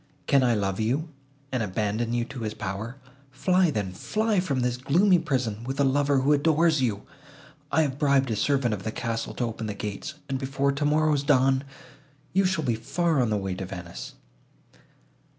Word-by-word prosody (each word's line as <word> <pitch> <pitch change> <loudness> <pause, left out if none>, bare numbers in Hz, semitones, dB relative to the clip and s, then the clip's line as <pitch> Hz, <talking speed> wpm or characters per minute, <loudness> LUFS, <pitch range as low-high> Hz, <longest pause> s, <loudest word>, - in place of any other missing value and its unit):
Can 140 -2 +4
I 120 -2 +3
love 95 -1 -1
you, 135 +9 0 0.4
and 130 -3 0
abandon 105 +3 -1
you 120 0 0
to 135 0 -8
his 110 -2 -4
power? 105 +5 -5 0.3
Fly, 180 +7 +2
then, 105 -9 -2
fly 215 - 0
from 140 -8 -1
this 125 0 0
gloomy 175 +9 +3
prison, 130 -9 -2
with 135 +3 -4
a - - +5
lover, 140 0 +2
who 140 +3 +4
adores 155 +1 +3
you! 105 -5 -1 0.7
I 160 - +4
have 140 -2 -3
bribed 140 -4 +3
a - - 0
servant 130 +1 +1
of 100 - -4
the 110 - -3
castle 115 0 -3
to - - -2
open 115 -1 -3
the 105 - -4
gates, 105 +9 -5
and, 135 -1 -2
before 140 +1 0
tomorrow's 150 +1 +2
dawn, 135 -2 +3 0.7
you 195 +1 +3
shall 185 -4 0
be 120 - +2
far 155 +7 0
on 120 - +1
the 105 - +1
way 95 -2 -3
to 95 +1 -5
Venice." 90 -3 -8
130 Hz, 185 wpm, -26 LUFS, 110-145 Hz, 0.7 s, a